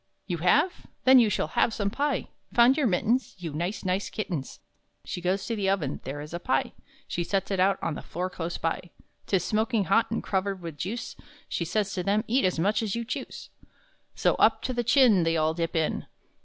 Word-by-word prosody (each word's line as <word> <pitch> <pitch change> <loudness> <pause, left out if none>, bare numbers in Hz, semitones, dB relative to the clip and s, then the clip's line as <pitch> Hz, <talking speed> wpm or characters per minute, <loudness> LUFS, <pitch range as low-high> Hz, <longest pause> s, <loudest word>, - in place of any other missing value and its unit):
"You 175 -4 -3
have? 290 - +2 0.2
Then 260 0 +8
you 230 -3 +4
shall 205 - -1
have 225 - +1
some 200 -1 -1
pie! 285 +2 -1 0.3
Found 240 +2 +6
your 280 -4 +2
mittens? 230 +6 +1
You 170 -4 -6
nice, 175 +7 -3
nice 185 +2 0
kittens!" 175 -10 -4 0.5
She 180 - -5
goes 190 +2 0
to 230 - -2
the 200 -3 0
oven; 165 -9 -1
there 140 +3 -5
is 150 +2 -9
a 170 - -3
pie; 135 -6 0 0.3
She 175 - -2
sets 195 +2 -1
it 195 - 0
out 190 +1 +3
on - - -1
the - - -6
floor 180 +2 -4
close 175 -2 -4
by; 165 +2 -2 0.4
'Tis 190 -2 +1
smoking 220 0 +1
hot, 225 +4 +2
and 230 - -2
covered 195 0 -1
with 165 -3 -7
juice; 225 +6 -4
And - - -18 0.2
she 170 - -2
says 200 +3 -1
to 185 - -1
them, 205 +4 +1
"Eat 250 +1 +2
as 185 - +1
much 205 +7 +2
as 215 -2 -2
you 235 0 -3
choose." 255 - -6 0.6
So - - +2
up - - +4
to 255 - -2
the 240 -1 -1
chin, 230 -4 +5
They 165 0 +1
all 155 0 +2
dip 165 0 -3
in. 160 -1 0
195 Hz, 220 wpm, -27 LUFS, 170-225 Hz, 0.6 s, Then